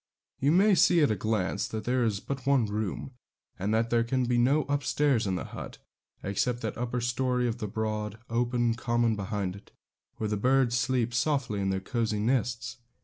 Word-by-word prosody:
You 140 +2 +3
may 195 +5 +5
see 175 -2 +5
at 145 - +3
a - - +1
glance 105 -1 -1
that 110 -1 -5
there 125 0 +1
is 105 -4 0
but 135 +3 -6
one 135 -4 +4
room, 105 +4 -3 0.5
and 100 +3 -1
that 115 +1 +1
there 120 -1 +3
can 125 +2 0
be 120 0 +1
no 140 +5 +3
up 145 0 -1
stairs 135 -4 +2
to 95 - 0
the - - -3
hut, - - -8 0.5
except 120 +5 -1
that 110 - -3
upper 125 +1 -2
storey 125 +1 0
of 120 0 -3
the 105 - -3
broad, 105 0 -3
open 120 0 +1
common 120 -1 +1
behind 100 -2 -3
it, 100 - -14 0.5
where 110 - -3
the 105 0 -1
birds 125 +2 +3
sleep 125 -1 0
softly 125 -5 0
in 95 - 0
their 95 0 0
cosy 110 +2 -1
nests. 120 +1 -1
120 Hz, 200 wpm, -28 LUFS, 110-125 Hz, 0.5 s, may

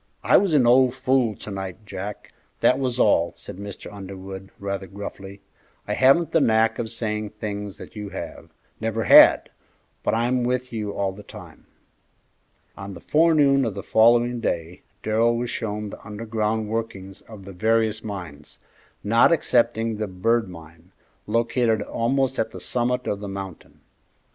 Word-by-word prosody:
"I - - +4
was 190 -6 +2
an 130 -4 +4
old 125 +1 +5
fool 130 -4 +1
to 105 - -9
night, 95 +1 -6
Jack; 100 +1 -7 0.3
that 125 - +4
was 125 -2 -2
all," 85 -7 +3
said - - -10
Mr. 100 0 -9
Underwood, 95 -1 -8
rather 100 -1 -4
gruffly. 100 0 -9 0.5
"I - - -1
haven't 140 +5 +4
the 165 - +3
knack 110 -1 +2
of 115 -2 -3
saying 110 -2 -3
things 105 -2 -5
that - - -12
you 105 -1 -6
have, - - -8 0.3
never 115 0 -2
had, - - +7 0.5
but - - 0
I'm 120 +2 +1
with 125 0 -2
you 105 -2 -3
all 100 -1 -1
the 100 +2 -11
time." - - -13 1.1
On 95 0 -8
the - - -9
forenoon 150 -4 +3
of 110 -5 -2
the 100 - -6
following 120 +2 +4
day 85 -5 -3 0.2
Darrell 115 +2 +2
was 120 0 -3
shown 105 -2 -4
the - - -11
underground 110 +1 -2
workings 105 -4 -5
of 105 -4 -11
the 100 - -9
various 110 +2 +1
mines, 85 -9 -8 0.5
not 115 +7 +4
excepting 115 -7 +1
the 110 0 -2
Bird 110 +3 0
Mine, 85 +1 -14 0.4
located 115 0 +1
almost 130 +5 -1
at - - 0
the - - -10
summit 125 +1 -1
of 100 - -2
the 100 - -6
mountain. 95 -3 -8
110 Hz, 160 wpm, -23 LUFS, 100-120 Hz, 1.1 s, had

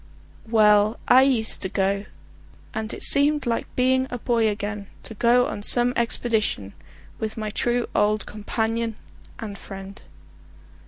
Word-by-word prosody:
Well, 210 -1 +4
I 255 +1 +7
used 250 -5 +2
to 190 - -2
go, 200 +1 -1 0.7
and 220 -1 -4
it - - 0
seemed 290 +1 +4
like 230 -1 -1
being 260 +1 +2
a 245 - -4
boy 230 -1 +1
again 205 -1 -5 0.2
to - - -8
go 240 +3 +3
on 205 - -5
some 240 +3 +2
expedition 220 - -1 0.5
with 220 0 -4
my 215 -1 -4
true 240 +3 0
old 210 +1 +1
companion 225 +2 -3 0.4
and 205 -3 -7
friend. 195 0 -10
220 Hz, 140 wpm, -23 LUFS, 210-240 Hz, 0.7 s, I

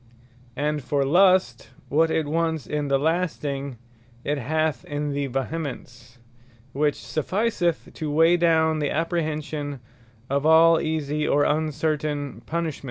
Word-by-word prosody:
And 150 +1 -1
for 140 +2 0
Lust, 180 -5 +3 0.2
what 160 +3 +2
it 160 -1 0
wants 160 0 -1
in 150 -1 -2
the 140 0 +2
lasting, 145 -4 -2 0.5
it 145 0 -1
hath 155 +5 -1
in 145 -3 -3
the 140 0 -2
vehemence, 130 -3 -5 0.6
which 145 +1 +1
sufficeth 175 +1 -1
to 155 - -4
weigh 165 +3 +4
down 160 -2 +3
the 145 -2 0
apprehension 155 -3 -2 0.5
of 140 +1 0
all 160 +1 +6
easie, 150 -1 -1
or 145 - +3
uncertain 150 -1 -1
punishments. 165 -2 -2
150 Hz, 125 wpm, -24 LUFS, 145-160 Hz, 0.6 s, all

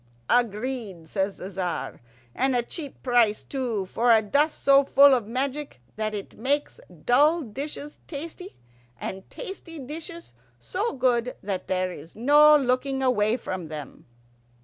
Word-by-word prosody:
"Agreed," 225 -6 -1
says 195 +2 -1
the 185 - -8
Tzar. 185 -2 -4 0.3
"And 265 0 +1
a 240 - +2
cheap 285 +2 -7
price, 240 -4 +3
too, 240 -8 -2
for 235 +5 +2
a 220 -1 +5
dust 290 +8 +1
so 275 0 +6
full 280 0 +6
of 240 -5 +1
magic 270 - -3 0.2
that 215 0 -2
it 200 0 -8
makes 285 +5 -1 0.3
dull 300 +7 +4
dishes 285 +5 -6
tasty, 335 +5 -7 0.4
and 190 0 -6
tasty 375 -8 -8
dishes 325 +5 -7 0.3
so 420 +5 -2
good 250 -2 +1
that 190 -2 -3
there 185 0 0
is 165 -1 -11
no 295 +6 +6
looking 265 0 0
away 230 -3 +2
from 185 -7 -5
them." 150 -3 -9
250 Hz, 145 wpm, -26 LUFS, 210-285 Hz, 0.4 s, so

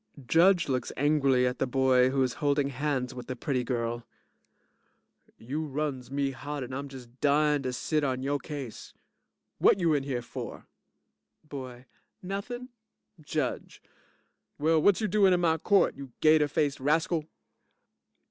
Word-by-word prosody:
JUDGE 175 +5 +4
looks 130 -2 -1
angrily 140 -3 +3
at 125 +1 -1
the 135 - +1
boy 130 0 +3
who 135 0 +1
is 125 - -1
holding 145 -1 +2
hands 135 -2 -2
with 125 - -8
the 130 - -4
pretty 130 0 -1
girl) 120 -1 -2 1.3
You 140 +8 -4
runs 140 -4 -3
me 140 0 -1
hot 145 +2 -5
and 125 +1 -7
I'm 140 +2 -4
just 125 -2 -12
dyin' 150 0 +3
to 130 -1 -2
sit 150 +5 -1
on 130 -2 -1
yo' 140 +1 0
case. 140 -5 -8 0.6
Whut - - +5
you 170 -3 +3
in 145 - +2
here 130 -3 -3
for? - - -7 0.8
BOY 130 -3 -8 0.4
Nothin'. 240 +7 -5 0.5
JUDGE 150 -3 -3 0.8
Well, 160 +1 +2
whut 205 +5 +4
you 215 - +1
doin' 200 -3 +4
in 180 - +2
my 160 -2 +2
court, 200 +4 +3
you 135 -2 -9
gater 155 -1 +5
faced 145 -1 0
rascal? 160 +3 +1
140 Hz, 150 wpm, -28 LUFS, 130-155 Hz, 1.3 s, Whut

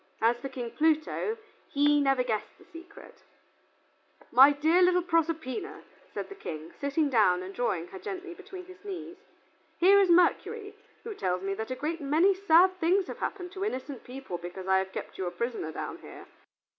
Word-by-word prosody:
As 230 +2 +3
for 275 - -6
King 245 -3 -6
Pluto, 320 +8 0 0.3
he 290 +1 +3
never 270 -2 +2
guessed 220 -4 -3
the - - -18
secret. 330 - -14 1.1
"My 265 +4 +8
dear 315 +5 +3
little 360 0 +4
Proserpina," 330 +4 -1 0.3
said - - -5
the - - -9
King, 160 - -8
sitting 285 +2 +1
down 205 -8 +3
and 190 +1 -8
drawing 190 -8 -1
her 190 - -9
gently 370 - -6
between 375 0 -10
his 370 +2 -15
knees, 375 -2 -7 0.6
"here 390 +3 +6
is 390 -2 +4
Mercury, 400 +5 +2 0.3
who 450 - -5
tells 185 - -2
me 195 0 -1
that 220 +4 -5
a 255 - -2
great 305 +5 -3
many 315 +8 +3
sad 370 0 +4
things 365 +3 +2
have - - -8
happened 360 -3 -4
to 390 0 -5
innocent 270 - -4
people 250 -8 -7
because 180 +2 -8
I 190 0 +4
have 190 0 -4
kept - - -7
you 185 - -2
a - - 0
prisoner 235 -9 -3
down - - -6
here. - - -12
300 Hz, 180 wpm, -29 LUFS, 235-365 Hz, 1.1 s, My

